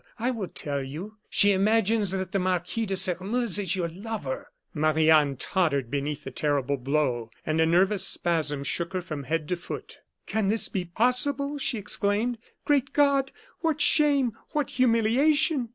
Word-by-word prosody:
I 245 +2 -1
will 220 -7 -4
tell 140 -4 -3
you: 165 +11 -8
she 205 - +4
imagines 210 +1 +2
that 190 0 -2
the 195 - 0
Marquis 185 +4 -1
de 195 - -1
Sairmeuse 190 +4 +2
is 190 -2 -1
your 175 -3 -1
lover." 190 -5 -6 0.3
Marie 155 +1 +2
Anne 150 -3 +4
tottered 140 -8 0
beneath 145 +1 -3
the 135 - -7
terrible 140 0 0
blow, 130 -3 -1 0.2
and 155 +1 0
a 160 - +3
nervous 190 +4 +3
spasm 155 -5 -1
shook 170 +5 -2
her 185 - -1
from 155 -5 -6
head 155 +2 -2
to 180 - +1
foot. 175 - -8 0.3
"Can 220 -3 -1
this 220 +2 +2
be 185 -2 -3
possible?" 265 +9 0
she 250 -3 -1
exclaimed. 210 +3 0 0.3
"Great 275 -2 +1
God! 280 -2 +2 0.3
what 320 -2 -1
shame! 285 -5 +3 0.2
what 295 -3 -1
humiliation!" 255 +3 +2
190 Hz, 165 wpm, -26 LUFS, 155-235 Hz, 0.3 s, she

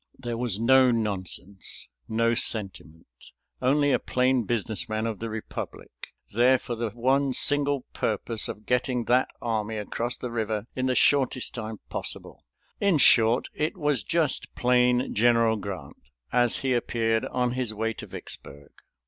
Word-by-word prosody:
There 120 -2 -4
was 115 -4 -2
no 130 +2 +5
nonsense, 100 -4 -3 0.2
no 115 +1 +2
sentiment. 95 -8 -2 0.6
Only 145 +3 +3
a - - +3
plain 125 -2 +1
business 110 -1 -2
man 110 +1 -1
of 110 -3 -3
the 115 - -4
republic 110 0 -7 0.4
there 125 +4 +5
for 120 - -6
the 115 -1 -2
one 130 +4 +1
single 145 -1 +3
purpose 110 +1 -1
of 105 - -8
getting 125 0 0
that 125 +2 +3 0.2
army 110 -1 -2
across 115 +3 -2
the 125 - -5
river 110 -2 -2
in 130 0 -1
the 130 - +1
shortest 130 -3 +2
time 110 -2 -6
possible. - - -4 0.4
In 200 -5 +3
short, 115 -3 +4
it 155 +4 -2
was 145 - +1
just 165 -5 0
plain 125 0 +2
General 115 0 +3
Grant, 95 -9 -7 0.3
as 120 -1 +3
he 130 - +2
appeared 115 -2 0
on 125 -1 -1
his 125 -2 -2
way 110 +1 -2
to - - -9
Vicksburg. 70 0 -9
120 Hz, 150 wpm, -26 LUFS, 110-130 Hz, 0.6 s, no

